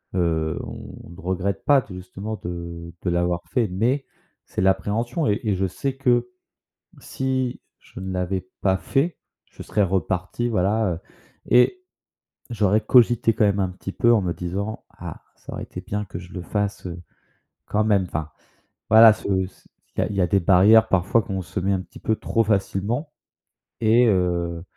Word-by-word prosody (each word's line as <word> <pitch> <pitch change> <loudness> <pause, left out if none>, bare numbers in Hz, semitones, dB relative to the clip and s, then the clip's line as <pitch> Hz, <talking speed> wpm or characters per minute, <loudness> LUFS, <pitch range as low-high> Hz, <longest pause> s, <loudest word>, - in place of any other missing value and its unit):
heu, 80 -3 0
on - - -9
ne 85 +2 -12
regrette 95 +2 -2
pas 140 -2 +5
t 95 - -12
justement 95 +4 -6
de 85 -1 -6
de 90 - -1
l'avoir 85 0 0
fait. 120 -4 +1
Mais 120 +9 0 0.4
c'est - - -4
l'appréhension 105 - +1
et 105 - +1
et 105 -3 +1
je 95 +1 0
sais 135 +8 -3
que, 125 -3 +2 0.7
si, 130 -2 -2 0.2
je - - -13
ne 95 0 -5
l'avais 90 0 -2
pas 95 -1 +2
fait, 150 - 0 0.3
je - - -10
serais 105 - +1
reparti, 95 +5 -1
voilà, 105 +1 +1
heu 80 - -6 0.5
et 365 - +4 0.7
j'aurais 105 -1 +2
cogité 115 0 +4
quand 105 - +2
même 100 -1 +2
un 95 - +1
petit 95 +1 -7
peu 120 0 +3
en 110 - +4
me 90 -1 -1
disant: 100 +5 -4
«Ah, - - -8
ça - - -11
aurait - - -5
été - - -8
bien 105 +1 -3
que 85 -2 -7
je 90 +1 -12
le 90 - -5
fasse, 100 +1 -2
heu, 85 -1 -6 0.7
quand 105 +1 +1
même, 100 -3 +3
enfin». 80 -3 -4 0.6
Voilà 110 0 +9
ce 105 - -6 0.2
c'est - - -24 0.3
il - - -19
y - - +2
a - - +1
il 100 - -4
y - - +1
a 90 - +4
des 100 +3 +2
barrières, 105 +5 +6
parfois 100 +5 +2
qu'on 95 -1 -4
se 90 +1 -4
met 100 +2 +1
un 95 - 0
petit - - -12
peu 110 - 0
trop 115 - +1
facilement 105 - -1 0.7
et 115 +3 +5
heu, 85 -3 0
100 Hz, 185 wpm, -23 LUFS, 90-115 Hz, 0.7 s, Voilà